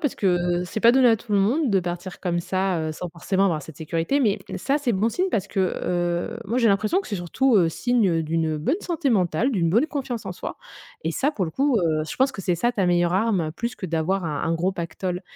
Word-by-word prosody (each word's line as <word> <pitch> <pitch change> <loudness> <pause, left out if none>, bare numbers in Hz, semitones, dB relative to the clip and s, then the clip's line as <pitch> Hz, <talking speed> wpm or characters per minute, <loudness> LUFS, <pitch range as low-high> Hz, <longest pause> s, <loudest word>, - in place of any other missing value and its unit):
parce 290 - -1
que 175 -2 +1
c'est 210 +5 -5
pas 235 +1 +6
donné 260 -2 +5
à 225 - +5
tout 220 -1 -8
le 200 - +4
monde 250 +7 +2
de 195 -1 +3
partir 175 +1 -6
comme 175 -2 -1
ça, 185 0 -1
heu, 155 0 -2
sans 180 +3 -6
forcément 190 +3 0
avoir 160 -6 0
cette 160 -1 -11
sécurité. 165 - -1
Mais 210 -5 +2 0.2
ça, 275 +9 0
c'est 270 -5 0
bon 205 +4 +1
signe 370 +10 0
parce 195 -2 0
que 195 - -2 0.2
heu, 175 +5 -1
moi, 230 +5 -1
j'ai 230 -2 +4
l'impression 215 - +2
que 390 - -10
c'est 205 - -3
surtout, 220 +8 +1
heu, 170 -4 +4
signe 205 -7 +1
d'une 160 -1 -1
bonne 275 - -1
santé 330 -5 -1
mentale, 195 - +2
d'une 170 -9 +1
bonne 235 - +3
confiance 265 -6 -4
en - - -3
soi, - - -7 0.4
et - - -1
ça, 285 +3 +1
pour 205 -11 -2
le - - -5
coup, 270 - +2
heu, 160 -3 +1
je - - -6
pense 265 +1 +2
que 195 - -7
c'est 175 -1 0
ça 240 +7 +1
ta 195 -5 0
meilleure 175 0 +2
arme, 195 -6 +1
plus 235 +7 -4
que 185 - -5
d'avoir 170 +3 -1
un 150 -3 -2
un 165 - 0
gros 175 +3 0
pactole. 180 +1 -4
190 Hz, 255 wpm, -24 LUFS, 175-235 Hz, 0.4 s, pas